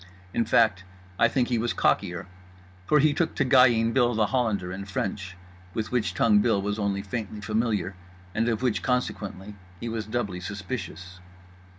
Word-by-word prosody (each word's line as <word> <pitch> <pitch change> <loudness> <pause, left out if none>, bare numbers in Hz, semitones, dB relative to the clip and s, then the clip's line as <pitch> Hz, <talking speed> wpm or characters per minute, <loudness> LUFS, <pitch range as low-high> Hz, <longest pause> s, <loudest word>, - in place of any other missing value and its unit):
In 115 - +1
fact 110 -4 +3 0.4
I - - +6
think 120 +1 +1
he 120 -2 +1
was 120 +1 -1
cockier; 90 -1 +1 0.6
for 150 - +4
he 150 +1 +4
took 165 +3 -1
to - - +1
guying 120 -3 +5
Bill 120 -3 +3
The 110 -1 +3
Hollander 105 -7 0
in 95 +1 -6
French, 95 -2 -4 0.4
with 110 -2 -2
which 105 -8 0
tongue 105 +1 +4
Bill 105 -1 +2
was 105 +2 -2
only 100 -1 -1
faintly 105 0 -5
familiar 105 -3 -1 0.4
and 115 +3 +1
of 115 +1 -1
which, 110 -8 +1
consequently, 105 -5 -2 0.3
he 115 - -4
was 110 -2 -4
doubly 110 -6 -2
suspicious. 95 -2 -6
110 Hz, 170 wpm, -26 LUFS, 100-120 Hz, 0.6 s, I